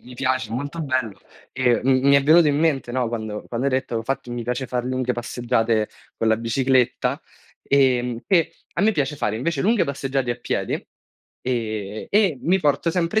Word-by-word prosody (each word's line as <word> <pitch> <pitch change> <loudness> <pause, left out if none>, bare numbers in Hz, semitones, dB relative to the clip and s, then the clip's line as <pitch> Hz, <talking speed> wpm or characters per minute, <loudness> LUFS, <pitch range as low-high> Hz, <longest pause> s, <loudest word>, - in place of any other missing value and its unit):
mi 125 0 -13
piace, 130 -1 -1
molto 145 +7 -4
bello. 130 -8 -2 0.3
E 125 -2 +2
m 130 0 +3
mi 140 - +6
è 140 - +5
venuto 155 +3 +6
in 145 - +1
mente, 150 -6 +1
no, 125 -2 0
quando 110 -2 -5
quando 125 +3 -2
hai 140 - +1
detto: 130 -3 -1
"Infatti 125 +2 -3
mi 120 -1 -4
piace 125 +2 -2
far 125 0 -2
lunghe 130 -1 -1
passeggiate 115 -2 0 0.3
con 115 - 0
la 110 - +4
bicicletta", 125 +2 +1 0.4
ehm, 125 -4 +2
che 170 -4 +2 0.2
a 180 - 0
me 220 +1 +4
piace 145 -2 -1
fare 105 -5 -1
invece 170 +9 -1
lunghe 220 +2 +3
passeggiate 135 -2 -2
a 120 - -2
piedi, 120 - -2 0.7
ehm, 110 -4 -3
e 195 -9 +2
mi 185 +2 +2
porto 150 +2 +1
sempre 180 +5 +1
130 Hz, 185 wpm, -22 LUFS, 120-140 Hz, 0.7 s, mi